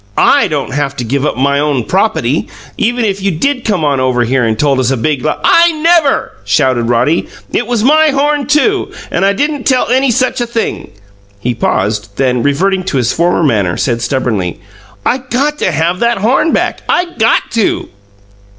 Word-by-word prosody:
I - - +4
don't - - -3
haf 140 -1 -2
to 125 - -4
give 140 +5 -1
up - - -3
my 140 +2 +1
own 145 -4 0
propaty, - - 0 0.3
even 240 +1 0
if 200 -2 -2
you 195 - +1
did 250 - -1
come 185 -8 0
on 140 -2 +1
over 130 -1 +1
here 125 +2 0
and 110 -1 0
told 140 0 +1
us 130 -1 +1
a 135 - 0
big 140 +1 -1
l - - -1
" - - -19
"I 340 0 +5
NEVER!" 320 -2 +2
shouted 120 +4 +1
Roddy. 125 +8 +1 0.3
"It 240 - -1
was 240 -3 -1
my 310 +4 +4
horn, 290 -1 0
too, 370 +7 +1 0.2
and - - 0
I 200 +1 +3
didn't 290 +4 -2
tell 255 -3 +1
any 260 +2 +2
such 255 +1 0
a 240 - -1
thing!" 230 -1 -3 0.5
He 125 +4 -2
paused; 105 -2 -2
then, 125 -2 +1
reverting 185 +8 0
to 155 - -1
his 120 -1 0
former 170 0 +1
manner, 100 - +1
said 120 -3 -1
stubbornly, 115 -9 -2 0.5
"I 260 - +1
got 270 +4 -2
to 185 - 0
have 165 +4 0
that 235 0 +1
horn 250 +10 +1
back. - - -1
I 355 - +2
GOT 225 +1 +3
to!" 225 -3 -1
170 Hz, 195 wpm, -13 LUFS, -, 0.5 s, I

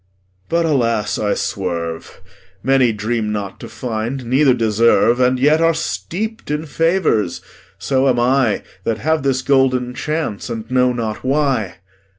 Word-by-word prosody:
But, 170 0 +1
alas, 115 -8 0
I 105 -1 0
swerve; 85 -4 -4 0.4
Many 130 -1 +3
dream 110 +1 -2
not 100 -2 -4
to - - -9
find, 120 +2 -4
neither 130 +2 +3
deserve, 115 +1 +3
And 125 0 +3
yet 150 +4 +4
are 165 0 +3
steep'd 220 +7 -4
in 150 +1 -2
favours; 165 - +1 0.4
so 130 +7 +1
am 125 -2 +2
I, 125 -2 +2 0.2
That 110 +1 -1
have 160 +4 0
this 130 -1 0
golden 130 -2 +2
chance, 145 -5 -3
and 115 -2 -5
know 125 0 +3
not 115 -3 -4
why. 135 -7 0
125 Hz, 145 wpm, -18 LUFS, 110-140 Hz, 0.4 s, yet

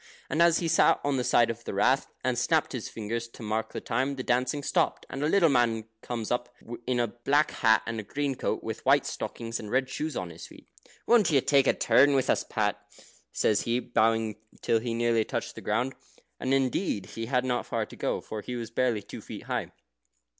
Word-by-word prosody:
And 155 - +2
as 170 -1 +5
he 170 - -1
sat 165 - +4
on 140 -1 +1
the 125 - 0
side 120 -1 +4
of 115 +1 -9
the - - -5
Rath, 130 +7 +3 0.2
and 130 -1 +1
snapped 135 +6 +1
his 125 -5 -5
fingers 115 +2 -4
to 115 - -12
mark 110 +1 -2
the - - -4
time, 130 +4 -1
the 130 - -5
dancing 125 +4 0
stopped, - - 0
and 135 - -4
a 150 - +2
little 185 -1 +5
man 120 -5 +2
comes 115 -3 -4
up, 120 0 -1 0.4
in 125 -1 +1
a 120 - +3
black 140 +7 +1
hat 110 -2 +3
and 115 -1 -3
a - - -5
green 140 +6 -2
coat, - - -2
with - - -5
white - - +4
stockings, 115 -1 -4
and 105 - -7
red 130 +3 +1
shoes 155 +4 -4
on 90 -2 -4
his 85 - -10
feet. - - -16 0.4
"Won't 230 -6 +5
you 145 -4 +4
take 140 +1 +3
a - - +5
turn 140 +2 +4
with 130 - +2
us, - - +1
Pat?" 105 -2 -1 0.5
says 105 - +2
he, 120 +1 0
bowing 115 -2 +1 0.3
till 115 - +3
he 115 0 -3
nearly 115 -1 +2
touched - - -4
the - - -9
ground. 125 +5 0 0.5
And, 130 - -2
indeed, 135 - 0
he 115 0 -5
had 125 0 +1
not 125 -1 -1
far - - -1
to - - -13
go, - - -2
for 110 - -6
he 125 - -6
was 115 -2 -5
barely 120 -5 0
two - - -9
feet - - -9
high. - - -3
120 Hz, 225 wpm, -28 LUFS, 115-135 Hz, 0.5 s, as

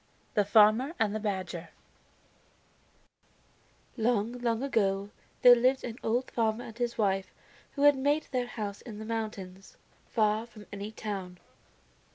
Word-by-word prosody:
THE 210 - +2
FARMER 220 - +5
AND 220 -3 +1
THE 215 - -2
BADGER 190 -5 -4 2.3
Long, 230 -2 +1
long 235 0 0
ago, 200 -6 0 0.3
there 245 - +11
lived 255 +2 +2
an 235 0 -6
old 240 +3 -1
farmer 225 0 0
and 225 - -10
his 240 0 -2
wife 195 -3 0 0.4
who 285 - -2
had 290 -1 +7
made 285 +3 +1
their 250 -2 -1
home 210 -4 -4
in 220 -4 -8
the 220 - -7
mountains, 205 -4 -5 0.3
far 215 0 +1
from 215 -3 -14
any 205 +1 -5
town. 195 -5 -5
220 Hz, 140 wpm, -29 LUFS, 205-245 Hz, 2.3 s, there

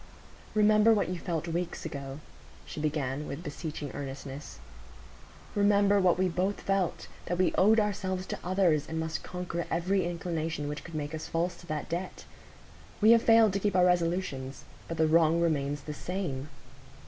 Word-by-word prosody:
"Remember 215 +1 +5
what 205 - 0
you 180 -1 -3
felt 170 -3 -3
weeks 170 +1 -3
ago," 140 -2 -6 0.4
she - - -7
began, 150 -2 -2
with 150 +5 -6
beseeching 150 -2 -5
earnestness; 140 0 -7 1.0
"remember 205 0 +4
what 180 -2 +3
we 185 0 +2
both 185 +3 -1
felt,—that 185 -2 -2
we 185 - +2
owed 215 +4 +5
ourselves 190 -3 -1
to - - -5
others, 180 -5 +2
and 160 0 -2
must 160 0 -3
conquer 180 -1 -4
every 185 +3 +1
inclination 165 -3 -3
which 150 0 -5
could 165 - -9
make 150 0 -3
us 160 - -5
false 170 +2 -1
to 175 - -15
that 155 -1 -3
debt. 175 +2 -5 0.7
We 220 +1 +6
have 230 -1 +7
failed 225 -3 +5
to 200 - 0
keep 200 -1 0
our 180 -1 +5
resolutions; 170 -7 0 0.2
but 165 - -5
the 160 - +4
wrong 165 +1 +4
remains 145 -4 0
the 150 +1 -6
same." 155 -5 -4
170 Hz, 165 wpm, -29 LUFS, 155-190 Hz, 1.0 s, have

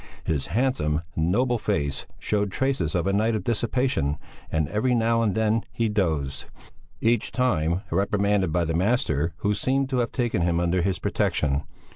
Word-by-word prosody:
His 75 -4 -1
handsome, 105 - 0
noble 115 +10 +1
face 70 -8 -1
showed 105 -2 -1
traces 130 - 0
of 85 - +1
a 100 - +1
night 110 +3 +2
of 110 - -2
dissipation, 120 - 0 0.3
and 80 -2 +1
every 125 +4 +1
now 115 0 +2
and 105 -4 +1
then 110 0 +2
he 115 -1 0
dozed, 80 -10 -1 0.6
each 115 -1 +2
time 90 -8 +1
reprimanded 100 -2 +1
by 85 +1 +1
the 80 - -1
master 85 - +1
who 105 - +2
seemed 135 +5 0
to 130 - +1
have 120 - 0
taken 120 -8 0
him 85 0 +1
under 85 +1 +1
his 95 0 0
protection. 70 -2 0
100 Hz, 165 wpm, -25 LUFS, 80-115 Hz, 0.6 s, night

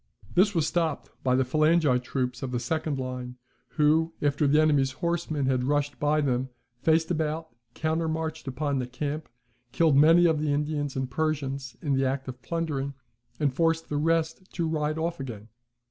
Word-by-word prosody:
This 195 +2 +4
was 160 -3 +2
stopped 165 -3 -1
by 125 -1 +3
the 130 - +3
phalangite 155 -2 +3
troops 125 -1 -2
of 135 - -3
the 125 -1 -1
second 155 +3 -2
line, 125 -1 -5 0.4
who, 160 +2 +3
after 145 0 +1
the 150 +2 +4
enemy's 145 -4 +3
horsemen 170 -2 -1
had 130 -1 +1
rushed 145 +1 0
by 150 +1 +2
them, 130 -2 0 0.3
faced 160 +1 +2
about, 160 0 -1 0.3
countermarched 160 -1 -2
upon 140 +1 -1
the 125 - -3
camp, 145 +4 -4 0.4
killed 160 -1 +3
many 165 +5 +6
of 160 -3 +3
the 150 -1 0
Indians 145 -1 -1
and 130 -1 -2
Persians 140 -3 -2
in 145 -3 +1
the 135 0 +2
act 135 0 -1
of 125 -1 -7
plundering, 145 -5 -2 0.4
and 145 -4 +1
forced 165 +2 +1
the 145 - -1
rest 165 +3 0
to 170 -2 -1
ride 155 -1 -1
off 165 0 -2
again. 115 -5 -7
150 Hz, 175 wpm, -27 LUFS, 135-160 Hz, 0.4 s, many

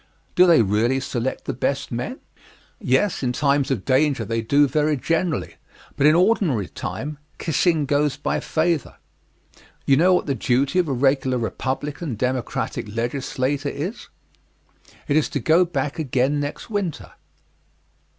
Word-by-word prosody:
Do 180 +1 +6
they 165 -9 +6
really 110 +6 +1
select 130 -1 -3
the - - -2
best 135 +3 -2
men? 125 - -4 0.6
Yes; 205 -4 +1
in 125 -2 0
times 140 0 +1
of 125 -8 -2
danger 135 -3 +2
they 115 +2 -1
do 140 +6 +3
very 150 +2 +1
generally, 165 +2 -1 0.4
but 140 - +4
in 155 - +5
ordinary 175 - +2
time, 145 - -6 0.2
"kissing 160 -1 +1
goes 145 0 +1
by 145 - -1
favor." 160 -1 -1 0.9
You 135 - +4
know 180 +4 +5
what - - 0
the 140 - 0
duty 135 - +1
of 175 - +1
a - - -2
regular 130 0 +1
Republican 135 +4 -3
Democratic 125 -1 -2
legislator 135 +3 -2
is. 170 +13 -5 1.0
It 145 - +1
is 155 - +1
to 145 - -2
get 165 +6 +3
back 145 0 -2
again 135 0 +1
next 145 +9 -5
winter. 200 -7 -3
140 Hz, 145 wpm, -22 LUFS, 130-160 Hz, 1.0 s, Do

